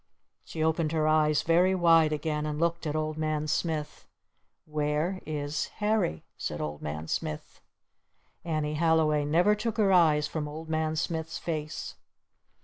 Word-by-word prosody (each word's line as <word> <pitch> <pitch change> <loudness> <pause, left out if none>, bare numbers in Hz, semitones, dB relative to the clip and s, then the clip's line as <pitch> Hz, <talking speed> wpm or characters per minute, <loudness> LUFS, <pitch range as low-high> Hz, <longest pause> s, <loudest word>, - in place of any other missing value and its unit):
She 160 - -4
opened 160 0 +1
her 155 -1 +1
eyes 155 -1 +3
very 180 +3 +3
wide 165 -3 +5
again 150 0 -2
and 150 0 -3
looked 170 0 0
at 150 - -2
Old 155 0 -2
Man 155 -1 -1
Smith. 150 0 -2 0.6
"Where 150 +4 -1
is 150 -1 -2
Harry?" 210 - 0 0.2
said - - -3
Old 75 -1 -4
Man 75 +2 -5
Smith. 75 -1 -4 0.8
Annie 155 -3 -1
Halliway 155 -2 +2
never 175 +8 +4
took 215 +2 -3
her 200 -3 +3
eyes 155 -4 +4
from 150 -1 -4
Old 160 +2 -8
Man 160 0 0
Smith's 160 0 -2
face. 155 -2 -5
155 Hz, 145 wpm, -28 LUFS, 150-165 Hz, 0.8 s, wide